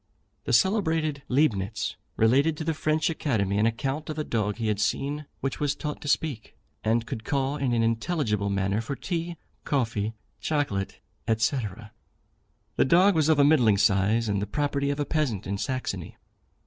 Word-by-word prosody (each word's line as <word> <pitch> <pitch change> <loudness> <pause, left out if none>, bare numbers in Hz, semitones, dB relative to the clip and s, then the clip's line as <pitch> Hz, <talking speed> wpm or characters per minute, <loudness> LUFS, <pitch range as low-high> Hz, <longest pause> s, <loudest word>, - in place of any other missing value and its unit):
The - - -2
celebrated 160 -7 +2
Leibnitz 110 -7 +1 0.2
related 140 +8 +3
to 160 - -3
the 160 +1 0
French 155 0 +1
Academy 105 -11 0
an 110 - +4
account 135 +7 -2
of 155 - -4
a 155 - -1
dog 105 -6 -1
he 115 - -3
had 105 -2 0
seen 140 +7 -1
which 135 - -2
was 145 0 0
taught 150 0 -5
to - - -7
speak, 140 -5 -1 0.3
and 115 +1 +1
could 110 - -5
call 135 +2 0
in 135 -3 -1
an 115 -1 +2
intelligible 115 - 0
manner 100 +2 0
for 125 +5 -4
tea, 170 0 -3 0.3
coffee, 115 -5 -1 0.2
chocolate, 140 -11 -1 0.4
&c. 110 +5 +1 1.2
The - - +4
dog 180 +8 +5
was 160 -2 +2
of 160 - +5
a 145 - +6
middling 125 -9 +5
size, 100 +3 +3
and 100 -1 0
the 105 - -2
property 140 +3 -1
of 140 +1 -2
a 145 - 0
peasant 135 - -1
in 100 0 -3
Saxony. 130 +2 -3
135 Hz, 175 wpm, -27 LUFS, 110-150 Hz, 1.2 s, a